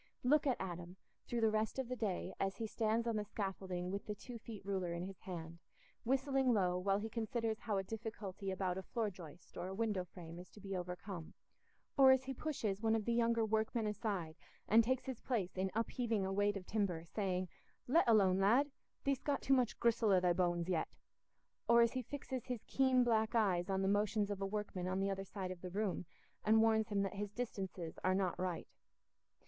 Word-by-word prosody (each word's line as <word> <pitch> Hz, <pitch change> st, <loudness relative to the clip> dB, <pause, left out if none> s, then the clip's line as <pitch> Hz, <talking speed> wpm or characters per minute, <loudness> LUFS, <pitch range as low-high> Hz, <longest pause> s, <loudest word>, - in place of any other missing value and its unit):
Look 295 Hz, +3 st, +4 dB
at 260 Hz, -, +2 dB
Adam 175 Hz, -1 st, -5 dB, 0.3 s
through 240 Hz, -1 st, -1 dB
the 220 Hz, -1 st, +4 dB
rest 215 Hz, +2 st, 0 dB
of 265 Hz, -2 st, -1 dB
the 255 Hz, -, -2 dB
day, 200 Hz, -5 st, -2 dB
as 195 Hz, 0 st, -1 dB
he 225 Hz, -, -2 dB
stands 220 Hz, +1 st, 0 dB
on 230 Hz, -2 st, 0 dB
the 210 Hz, -, 0 dB
scaffolding 190 Hz, -3 st, -3 dB
with 200 Hz, +1 st, -4 dB
the 210 Hz, -, -2 dB
two 235 Hz, +3 st, -8 dB
feet 215 Hz, -3 st, -9 dB
ruler 190 Hz, -3 st, -1 dB
in 170 Hz, +1 st, -3 dB
his 190 Hz, -1 st, -8 dB
hand, 170 Hz, -2 st, -7 dB, 0.4 s
whistling 265 Hz, 0 st, +2 dB
low 180 Hz, -3 st, +2 dB
while 195 Hz, +1 st, +2 dB
he 210 Hz, +2 st, -3 dB
considers 225 Hz, 0 st, -2 dB
how 210 Hz, -4 st, -1 dB
a 195 Hz, -, 0 dB
difficulty 205 Hz, -2 st, -5 dB
about 190 Hz, -1 st, -1 dB
a -, -, -4 dB
floor 215 Hz, +2 st, -2 dB
joist 175 Hz, -2 st, -12 dB
or 180 Hz, -, -3 dB
a 190 Hz, -, -5 dB
window 210 Hz, -4 st, 0 dB
frame 175 Hz, -2 st, -10 dB
is 180 Hz, -1 st, -10 dB
to -, -, -13 dB
be 195 Hz, -1 st, -5 dB
overcome; 180 Hz, -1 st, -5 dB, 0.6 s
or 270 Hz, -1 st, +8 dB
as 260 Hz, 0 st, +6 dB
he 265 Hz, +1 st, -4 dB
pushes 230 Hz, -9 st, -2 dB
one 225 Hz, 0 st, +3 dB
of 220 Hz, -2 st, -1 dB
the 235 Hz, -, +1 dB
younger 230 Hz, -1 st, +3 dB
workmen 220 Hz, +1 st, 0 dB
aside 200 Hz, -7 st, -2 dB, 0.3 s
and 225 Hz, +2 st, +6 dB
takes 260 Hz, +2 st, 0 dB
his 260 Hz, -4 st, -4 dB
place 205 Hz, -8 st, -1 dB
in 190 Hz, 0 st, 0 dB
upheaving 225 Hz, -2 st, 0 dB
a 190 Hz, -, -1 dB
weight 205 Hz, +1 st, +2 dB
of 185 Hz, -, -8 dB
timber, 185 Hz, -7 st, -1 dB
saying, 185 Hz, 0 st, -1 dB, 0.4 s
"Let 275 Hz, +1 st, +4 dB
alone, 195 Hz, -4 st, +5 dB
lad! 245 Hz, +9 st, +4 dB, 0.3 s
Thee'st 275 Hz, -2 st, 0 dB
got 285 Hz, -1 st, 0 dB
too 270 Hz, -, +4 dB
much 250 Hz, -4 st, +2 dB
gristle 235 Hz, -2 st, +3 dB
i' 185 Hz, -, +6 dB
thy 180 Hz, -1 st, +3 dB
bones 175 Hz, -1 st, +1 dB
yet"; 175 Hz, -4 st, +1 dB, 0.8 s
or 235 Hz, 0 st, +8 dB
as 235 Hz, -, +2 dB
he 260 Hz, -, -1 dB
fixes 260 Hz, -1 st, -5 dB
his 250 Hz, -4 st, -3 dB
keen 260 Hz, -2 st, +4 dB
black 225 Hz, -1 st, +2 dB
eyes 190 Hz, -5 st, +2 dB
on 190 Hz, 0 st, +1 dB
the -, -, +2 dB
motions 205 Hz, +1 st, +2 dB
of 200 Hz, -1 st, -4 dB
a 195 Hz, -, 0 dB
workman 195 Hz, -3 st, -3 dB
on 185 Hz, +1 st, 0 dB
the 195 Hz, 0 st, +1 dB
other 195 Hz, 0 st, -3 dB
side 190 Hz, -1 st, -5 dB
of 180 Hz, -1 st, -7 dB
the 180 Hz, -, -5 dB
room 195 Hz, -2 st, -2 dB, 0.4 s
and 220 Hz, +1 st, +5 dB
warns 220 Hz, -1 st, +3 dB
him 200 Hz, -2 st, +1 dB
that 195 Hz, -, -2 dB
his 205 Hz, +1 st, -3 dB
distances 195 Hz, -7 st, -4 dB
are 185 Hz, 0 st, +3 dB
not 190 Hz, -2 st, 0 dB
right. 180 Hz, -2 st, -2 dB
205 Hz, 215 wpm, -37 LUFS, 185-230 Hz, 0.8 s, or